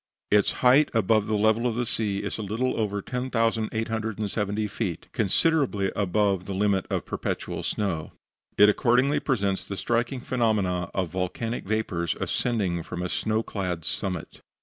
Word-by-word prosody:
Its 105 0 +4
height 135 +4 +6
above 110 0 +3
the 110 -1 +1
level 110 +3 +3
of 115 - -1
the 120 +1 0
sea 105 -4 -1
is - - -4
a - - -2
little 115 +5 -1
over 100 -3 -1
10,870 110 -3 -1
feet, 100 -5 -4
considerably 110 - +2
above 100 -1 +1
the 100 - -4
limit 100 -1 +1
of - - -1
perpetual - - -3
snow. 85 -7 -2 0.5
It 105 - +8
accordingly 125 +6 +3
presents 100 -8 -1
the 100 - -5
striking 120 +4 -1
phenomenon 100 -9 0
of 95 -3 0
volcanic 95 +7 -3
vapors 95 -6 -1
ascending 100 -8 0
from 90 +2 -5
a 90 - -2
snow 110 +3 0
clad 90 -7 -3
summit. 90 -2 -3
105 Hz, 150 wpm, -26 LUFS, 95-115 Hz, 0.5 s, It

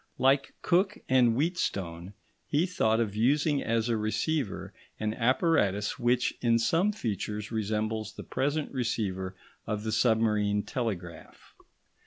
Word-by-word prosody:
Like 135 +1 +2
Cooke 180 +3 +2
and 125 -3 +4
Wheatstone, 100 - -2 0.3
he 150 +4 +2
thought 115 -12 +1
of 105 -3 -1
using 145 +6 +2
as 115 0 0
a 115 - +1
receiver 110 - -2 0.3
an 110 0 -1
apparatus 115 - +1
which 120 +1 +2
in 115 -1 +3
some 165 - +2
features 105 - -4
resembles 110 0 -2
the - - -8
present 145 +2 -1
receiver 95 -7 -2 0.3
of 105 -1 -2
the 110 - -2
submarine 105 -3 +2
telegraph. 100 -9 -5
115 Hz, 125 wpm, -29 LUFS, 105-135 Hz, 0.3 s, and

